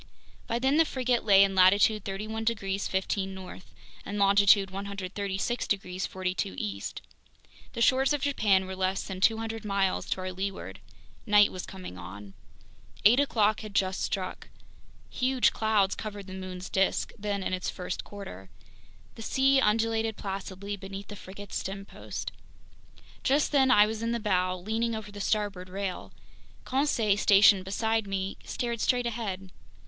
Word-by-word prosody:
By 230 - 0
then 265 +4 +2
the 325 - +7
frigate 255 -4 0
lay 200 -2 +7
in 195 -1 +1
latitude 200 +3 +4
31 215 +3 -4
degrees 200 -4 -1
15' 190 0 -2
north 185 -1 -10 0.3
and 205 - -5
longitude 200 -1 +5
136 195 +3 -3
degrees 185 -2 -2
42' 185 - -3
east. 100 0 -4 0.7
The 235 - 0
shores 265 +3 +4
of 295 -2 0
Japan 205 -9 +2
were 190 0 -6
less 190 0 -1
than 185 -1 -7
200 225 +1 +1
miles 195 -2 0
to 185 - -1
our 185 0 -3
leeward. 195 +1 -5 0.5
Night 210 -1 +6
was 185 - -6
coming 185 - -9
on. 100 +3 -10 0.7
Eight 235 +6 +7
o'clock 215 -7 +2
had 215 -2 -9
just 190 -1 +1
struck. 185 -2 -3 0.6
Huge 255 -2 +2
clouds 210 -3 +2
covered 205 -2 -6
the 190 - -9
moon's 185 -1 -6
disk, 190 0 0
then 200 -1 -2
in 185 - -2
its 185 - -2
first 180 - -5
quarter. 145 - -10 0.6
The - - -11
sea 270 +4 +3
undulated 225 0 +1
placidly 195 0 -5
beneath 195 +1 -8
the 205 - -7
frigate's 200 +1 -7
stempost. 195 +1 -6 0.9
Just 285 +3 +2
then 270 -3 +4
I 210 -4 +7
was 220 +1 -4
in 230 +1 -1
the 235 - -1
bow, 185 -4 +1
leaning 220 +5 -1
over 215 -1 -7
the 205 0 -7
starboard 200 -3 -1
rail. 195 0 -4 0.5
Conseil, 245 -7 +1
stationed 200 -2 +6
beside 220 +2 0
me, 195 0 -3
stared 235 -2 -3
straight 245 -1 +2
ahead. 200 -5 -4
200 Hz, 155 wpm, -28 LUFS, 190-225 Hz, 0.9 s, the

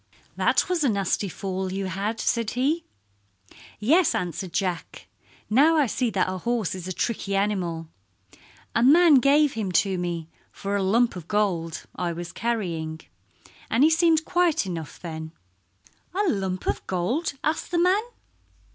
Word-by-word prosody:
"That - - +2
was 360 -4 0
a 275 - +3
nasty 200 -1 0
fall 190 0 -4
you 195 +1 -3
had," 200 +5 -3
said 230 -2 0
he. 290 +7 0 0.9
"Yes," 310 - +3
answered 180 +1 -3
Jack. 185 -3 -3 0.4
"Now 295 +9 +4
I 295 - +4
see 245 +1 -1
that 190 -4 0
a 185 0 -3
horse 230 -1 -1
is 185 -1 -6
a - - -3
tricky 200 0 -2
animal. 180 -5 -1 0.9
A 230 - +2
man 300 +3 +7
gave 285 +2 +4
him 210 -4 -3
to 190 +1 +2
me 170 -2 -3 0.2
for 200 0 -4
a 200 - +1
lump 225 +5 +2
of 175 -3 -8
gold 180 -6 -1
I 175 -2 -2
was 175 +1 -6
carrying, 170 -9 -3 0.7
and 235 +5 +3
he 315 - +6
seemed 320 -1 +3
quiet 350 - +2
enough 165 -4 -6
then." 160 -2 -7 0.8
"A 405 - +2
lump 190 - -1
of - - -2
gold?" 220 - -1
asked 310 +1 -1
the 350 - -1
man. 365 +4 +4
200 Hz, 155 wpm, -25 LUFS, 180-275 Hz, 0.9 s, man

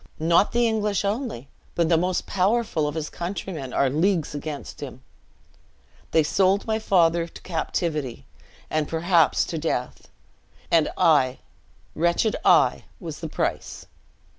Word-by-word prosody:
Not 170 +5 +3
the 240 0 +2
English 210 -2 0
only, 205 - -3 0.3
but 170 -1 +2
the 165 - +4
most 180 +2 0
powerful 195 -5 +1
of 150 - -4
his 155 -2 -3
countrymen 170 -6 -5
are 140 - +2
leagues 160 +4 +1
against 145 0 -6
him. 130 -2 -8 1.1
They 160 - +3
sold 190 +5 +2
my 220 0 0
father 170 -5 +2
to - - -13
captivity, 155 -6 -3 0.4
and, 155 -1 -1
perhaps, 165 -1 +2
to 165 - -4
death; 135 -5 -3 0.6
and 165 -2 +4
I, 145 -8 +3 0.6
wretched 170 +6 +1
I, - - +4
was - - -7
the - - -5
price. - - -3
170 Hz, 135 wpm, -24 LUFS, 150-195 Hz, 1.1 s, the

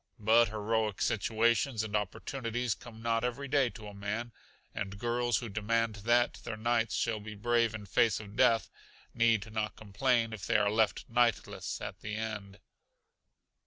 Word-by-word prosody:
But 115 +2 +5
heroic 110 -1 -1
situations 115 +2 +1
and 110 -1 -3
opportunities 115 +3 -2
come 115 0 -12
not 115 0 +1
every 125 +3 -2
day 135 -2 +3
to 110 -2 -11
a 105 - -9
man, 105 +4 -4 0.4
and 100 -1 -4
girls 120 +1 +1
who 120 - -4
demand 110 +1 0
that 120 +4 +2
their 110 - -5
knights 115 0 +1
shall 115 -2 0
be 105 0 -8
brave 115 +1 +1
in 105 -2 -7
face 110 +2 +2
of 105 -1 -10
death 115 -1 +3 0.4
need 115 -2 +2
not 110 -1 -2
complain 115 +2 0
if 100 -4 -6
they - - +4
are 105 0 +2
left 110 -1 +1
knightless 120 -1 0
at - - -6
the 105 0 -5
last. 105 -3 -5
110 Hz, 160 wpm, -31 LUFS, 105-120 Hz, 0.4 s, But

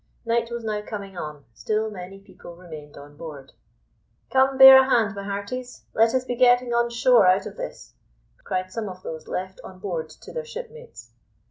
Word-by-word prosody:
Night 230 0 0
was 235 -1 -5
now 210 -1 -2
coming 200 -2 -8
on; 150 -4 -7
still 215 - -2
many 190 0 -9
people 195 -3 -14
remained 155 -4 -11
on 145 +1 -13
board. 145 -4 -10 0.8
"Come, 265 0 +3
bear 265 0 +11
a 265 - -1
hand, 220 -6 +2
my 200 - -6
hearties; 200 +6 -6
let 225 +2 +3
us 255 0 0
be 245 - -3
getting 245 0 +4
on 235 0 +2
shore 235 -3 +4
out 185 +2 +3
of - - -8
this," - - -8 0.5
cried 185 0 -3
some 215 0 -4
of 185 0 -11
those 160 -1 -7
left 190 +1 -5
on 185 - -11
board 175 -5 -4
to - - -13
their 485 - -4
shipmates. 475 0 -10
210 Hz, 190 wpm, -24 LUFS, 185-245 Hz, 0.8 s, bear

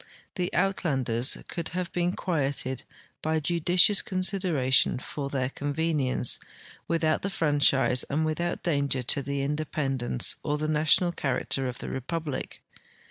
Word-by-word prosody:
The 180 -1 -2
Uitlanders 135 -10 +1
could 170 -2 -4
have 180 -2 -3
been 175 0 0
quieted 140 -8 -2 0.4
by 160 0 0
judicious 175 +5 +4
consid 185 +1 +1
eration 130 -8 +2
for 140 +2 -5
their 130 -2 -1
convenience, 145 -3 +1 0.5
Avithout 160 -2 +1
the 200 - -2
franchise 145 -7 +2
and 155 +3 -1
with 155 +2 -2
out 175 0 -2
danger 140 -5 0
to 140 +4 +2
the 140 0 -3
independence 140 - 0
or 150 - -1
the 155 +1 -2
national 155 +3 +2
character 135 -3 -1
of 125 -1 -5
the - - -8
rejAuhlic. 145 +1 -4
150 Hz, 135 wpm, -27 LUFS, 135-170 Hz, 0.5 s, judicious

